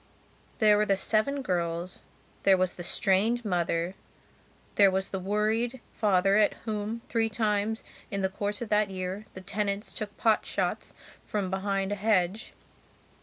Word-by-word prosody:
There 210 -3 +5
were 210 - +3
the 195 - +3
seven 225 +8 +1
girls, 175 -3 -2 0.4
there 195 -1 +5
was 185 0 +1
the - - -8
strained 210 +6 +2
mother, 175 -2 0 0.8
there 200 -1 +6
was 190 0 -1
the 190 - -3
worried 215 +6 0
father 195 -2 +3
at 215 -1 +3
whom, 220 +1 -3
three 225 -1 +1
times 215 0 0 0.3
in 200 -1 -2
the - - +3
course 205 +3 -3
of 225 - -8
that 210 -1 +2
year, 190 +2 -4
the 185 - -7
tenants 200 +2 -2
took 210 -2 -6
pot 220 -2 +3
shots - - -2 0.3
from 200 -3 -2
behind 195 0 -1
a - - 0
hedge. 205 -1 +1
205 Hz, 155 wpm, -28 LUFS, 190-215 Hz, 0.8 s, there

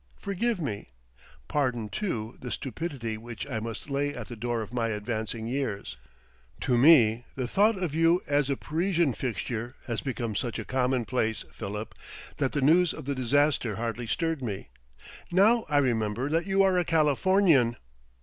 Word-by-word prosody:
Forgive 205 +2 -1
me.... 105 - -4 0.6
Pardon, 125 -6 0
too, 115 - -3
the 125 - -5
stupidity 130 -5 -4
which 120 +3 -7
I 120 -5 -2
must 115 +2 -6
lay 145 0 -1
at - - -7
the 120 - -6
door 115 0 -2
of 110 - -11
my 120 -2 0
advancing 110 +1 -3
years; 115 - -3 0.7
to 125 - +2
me 120 -4 +6
the 130 -2 -2
thought 210 - +3
of 180 -6 -2
you 165 +2 +4
as 145 -1 +1
a 140 - 0
Parisian 170 -2 +1
fixture 120 -1 -4
has 115 -3 -2
become 120 -4 -3
such 120 +1 -2
a - - -5
commonplace, 125 -3 0
Philip, 105 +1 -6 0.4
that 135 -3 0
the 145 - 0
news 165 +5 +4
of - - -8
the 140 - -1
disaster 130 -3 +1
hardly 115 +1 -3
stirred 165 +3 -1
me. 100 - -5 0.6
Now 215 +6 +4
I 145 - +2
remember 120 -1 +1
that 165 +4 0
you 195 0 +4
are 190 -2 +3
a - - +2
Californian!" 160 -4 +3
130 Hz, 165 wpm, -28 LUFS, 115-160 Hz, 0.7 s, me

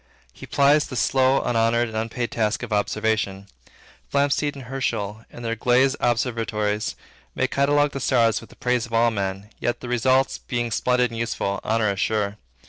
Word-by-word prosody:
He - - -11
plies 145 +2 +3
the 130 - -7
slow, 130 +4 +2
unhonored, 115 0 +2
and 110 - -8
unpaid 115 +2 -2
task 110 +1 0
of 115 -3 -4
observation. 105 -1 0 0.7
Flamsteed 145 +1 +1
and 135 -2 -9
Herschel, 110 -4 -3
in 120 - -11
their 115 0 -1
glazed 125 +4 +3
observatories, 110 -3 -1 0.4
may 130 - +1
catalogue 145 +2 +2
the 135 - -5
stars 120 -4 +2
with 115 - -14
the - - -16
praise 125 -1 0
of 115 - -13
all 115 +1 +4
men, 100 0 -4
and, 120 - 0
the 125 - -8
results 130 +2 +2
being 120 -2 -3
splendid 125 +2 +1
and 115 - -5
useful, 100 -4 -2
honor 110 -2 +1
is 95 - -7
sure. 105 -1 0
115 Hz, 175 wpm, -23 LUFS, 110-130 Hz, 0.7 s, all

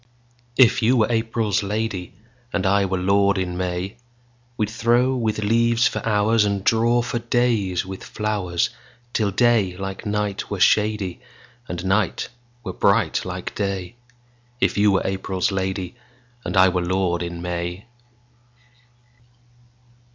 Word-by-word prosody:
If 125 -2 +5
you 120 +3 +3
were 110 +1 +2
April's 115 -2 0
lady, 105 -2 -3 0.4
And 100 -1 -1
I 100 +1 +3
were 95 0 -1
lord 100 +2 +2
in 90 -1 -2
May, 90 +4 -3 0.6
We'd 105 -1 -1
throw 120 +3 +2
with 110 -4 -1
leaves 115 +3 +3
for - - -2
hoursAnd 105 -2 +1
draw 115 +3 +3
for 120 0 -2
days 115 -7 0
with 95 0 -8
flowers, 105 -2 -1 0.4
Till 105 -3 +1
day 100 -4 +2
like 95 0 -5
night 105 -1 -2
were - - -3
shadyAnd 105 -1 -1
night 95 +1 0 0.3
were - - -5
bright - - +2
like - - -5
day; 100 -2 -3 0.7
If - - +1
you 105 0 +4
were 95 - +2
April's 95 +2 -1
lady, 95 -1 -2 0.5
And - - -3
I 95 0 +7
were 90 0 0
lord 90 -1 0
in 85 0 -5
May. 90 +2 -4
100 Hz, 130 wpm, -22 LUFS, 95-115 Hz, 0.7 s, I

